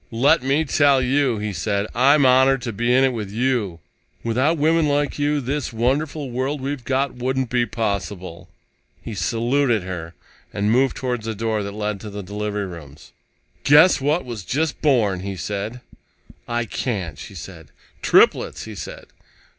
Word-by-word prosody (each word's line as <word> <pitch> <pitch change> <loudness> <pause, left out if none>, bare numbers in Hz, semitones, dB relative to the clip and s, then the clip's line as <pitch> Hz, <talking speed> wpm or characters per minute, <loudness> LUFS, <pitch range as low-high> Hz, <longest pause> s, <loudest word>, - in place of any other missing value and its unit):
"Let 120 +5 +3
me 140 +5 +1
tell 140 -2 +4
you," 130 -1 +1
he 105 0 -3
said, 100 +1 -1
"I'm 140 +3 +4
honored 130 0 +4
to 115 - -3
be 120 +4 0
in 130 +2 +5
it 135 -1 +2
with 105 -4 -4
you. 110 -6 -1 0.4
Without 130 +8 +1
women 160 +1 +3
like 145 0 0
you, 145 0 +1
this 140 +2 -3
wonderful 135 +4 -1
world 130 +4 -2
we've 135 -1 -4
got 130 +2 0
wouldn't 130 0 -2
be 120 -1 +1
possible." 100 -5 -4 0.5
He 115 - -6
saluted 115 +4 +1
her 85 -3 -6 0.4
and 100 +1 0
moved 130 +3 +2
toward 125 -3 -2
the 110 0 -4
door 110 0 -1
that 100 0 -5
led 105 -1 -3
to 105 - -8
the 100 0 -6
delivery 105 +1 -3
rooms. 80 -6 -11 0.5
"Guess 150 +2 +6
what 150 +5 +1
was 115 -5 -6
just 145 - -1
born," 115 -10 +2
he 100 +1 -5
said. 105 +6 -4 0.7
"I 120 0 -1
can't," 95 - -3
she - - -10
said. - - -10 0.3
"Triplets!" - - +3
he - - -8
said. - - -8
120 Hz, 165 wpm, -22 LUFS, 105-135 Hz, 0.7 s, Guess